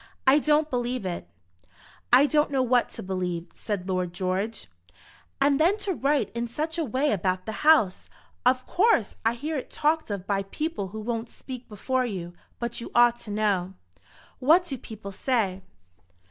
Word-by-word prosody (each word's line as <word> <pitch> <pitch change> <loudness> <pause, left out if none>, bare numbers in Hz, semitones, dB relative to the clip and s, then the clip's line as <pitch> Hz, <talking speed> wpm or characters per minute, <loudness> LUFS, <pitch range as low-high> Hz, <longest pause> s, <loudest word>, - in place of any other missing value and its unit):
I 275 +2 +6
don't 300 +1 +3
believe 245 -4 -2
it." 175 - -4 0.8
"I 255 +4 +8
don't 300 0 +2
know 270 -2 +1
what 245 -1 +2
to - - -7
believe," 180 -2 -3
said 200 -4 -4
Lord 180 -2 -1
George. 190 +4 -2 0.7
"And 275 0 +3
then 355 +6 +4
to 405 -2 -2
write 285 -2 +1
in 235 0 -2
such 315 +8 -3
a - - +1
way 270 +3 0
about 185 -1 0
the 220 - -3
house! 300 -12 +4 0.3
Of 255 +1 +3
course 365 - +2
I 225 +1 +2
hear 300 +5 -3
it - - -9
talked 315 -1 0
of 200 -3 -4
by 200 -1 0
people 250 - -3
who 215 +3 -7
won't 230 +1 -3
speak 255 -2 -9
before 255 +5 -1
you; 175 -5 -5 0.2
but 235 0 -4
you - - -6
ought 240 0 +6
to 235 - -8
know." 200 -3 0 0.6
"What 320 +8 +5
do 280 - -4
people 215 -4 -9
say?" 195 -4 0
235 Hz, 175 wpm, -26 LUFS, 195-285 Hz, 0.8 s, I